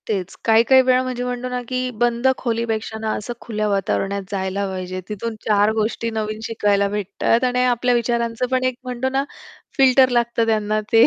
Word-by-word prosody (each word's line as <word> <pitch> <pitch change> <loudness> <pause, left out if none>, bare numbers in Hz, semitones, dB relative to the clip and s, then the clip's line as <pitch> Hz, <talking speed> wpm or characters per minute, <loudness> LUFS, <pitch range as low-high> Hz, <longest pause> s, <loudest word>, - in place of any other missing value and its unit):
तेच. 195 -4 -3
काही-काही 230 +4 +6
वेळा 255 0 +3
म्हणजे 250 -1 -3
म्हणतो 250 0 -3
ना 250 0 -3
की 255 0 -2
बंद 240 +1 +2
खोलीपेक्षा 225 -2 -2
ना 220 0 -3
असं 240 +3 -5
खुल्या 215 -2 -2
वातावरणात 200 0 -1
जायला 195 0 -2
पाहिजे, 185 0 -5
तिथून 220 +2 -4
चार 210 0 +3
गोष्टी 220 +1 -1
नवीन 215 -1 -3
शिकायला 205 -3 +1
भेटतात 210 +4 0
आणि 250 0 +2
आपल्या 245 0 +2
विचारांचं 235 0 0
पण 255 0 +1
एक 255 -1 0
म्हणतो 250 0 -2
ना 270 +1 0 0.5
फिल्टर 265 -1 +5
लागतं 235 -1 +1
त्यांना 215 -1 +1
ते 225 0 +7
230 Hz, 175 wpm, -21 LUFS, 210-250 Hz, 0.5 s, ते